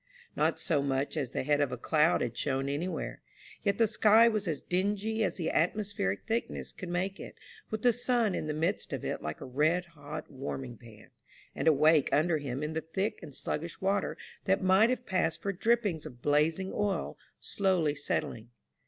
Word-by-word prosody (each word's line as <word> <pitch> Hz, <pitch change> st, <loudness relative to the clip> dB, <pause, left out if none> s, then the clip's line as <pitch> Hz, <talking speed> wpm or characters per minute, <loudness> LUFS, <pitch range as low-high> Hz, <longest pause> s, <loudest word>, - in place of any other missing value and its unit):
Not -, -, +1 dB
so 155 Hz, -6 st, +1 dB
much 140 Hz, +1 st, -1 dB
as 140 Hz, -5 st, -1 dB
the -, -, -2 dB
head 145 Hz, +1 st, +2 dB
of 140 Hz, -3 st, +1 dB
a 125 Hz, -, -3 dB
cloud 155 Hz, +6 st, +3 dB
had 120 Hz, -1 st, -2 dB
shown 135 Hz, 0 st, -1 dB
anywhere; 155 Hz, +6 st, -3 dB, 0.4 s
yet 200 Hz, -1 st, +1 dB
the 230 Hz, -, +5 dB
sky 220 Hz, +1 st, +5 dB
was 215 Hz, -4 st, 0 dB
as 155 Hz, -4 st, -2 dB
dingy 205 Hz, +4 st, 0 dB
as -, -, 0 dB
the 165 Hz, -3 st, -1 dB
atmospheric 180 Hz, -, 0 dB
thickness 230 Hz, +1 st, -2 dB
could 185 Hz, -, -7 dB
make 185 Hz, +3 st, -2 dB
it, -, -, -9 dB, 0.3 s
with 220 Hz, -1 st, -4 dB
the 245 Hz, -1 st, +5 dB
sun 245 Hz, -3 st, +1 dB
in 155 Hz, -, -3 dB
the 155 Hz, -, -1 dB
midst 160 Hz, +2 st, -1 dB
of -, -, -4 dB
it -, -, -2 dB
like 75 Hz, 0 st, -5 dB
a -, -, -5 dB
red 155 Hz, +7 st, +1 dB
hot 145 Hz, -1 st, -8 dB
warming 130 Hz, -2 st, -5 dB
pan, 110 Hz, -2 st, -15 dB, 0.4 s
and -, -, -2 dB
a -, -, +9 dB
wake 155 Hz, +1 st, +4 dB
under 160 Hz, +1 st, +3 dB
him 135 Hz, 0 st, -4 dB
in 155 Hz, +1 st, -3 dB
the 160 Hz, -, -1 dB
thick 190 Hz, +7 st, -2 dB
and 145 Hz, -5 st, -10 dB
sluggish 165 Hz, +2 st, -4 dB
water 195 Hz, +1 st, 0 dB, 0.3 s
that 195 Hz, 0 st, +2 dB
might 190 Hz, +5 st, +5 dB
have 250 Hz, -1 st, -1 dB
passed 185 Hz, -4 st, 0 dB
for 200 Hz, -, -1 dB
drippings 205 Hz, -6 st, +1 dB
of 125 Hz, -5 st, -12 dB
blazing 160 Hz, +6 st, +2 dB
oil 205 Hz, -2 st, -1 dB, 0.2 s
slowly 185 Hz, -7 st, +1 dB
settling. 120 Hz, -5 st, -3 dB
165 Hz, 195 wpm, -30 LUFS, 145-200 Hz, 0.4 s, a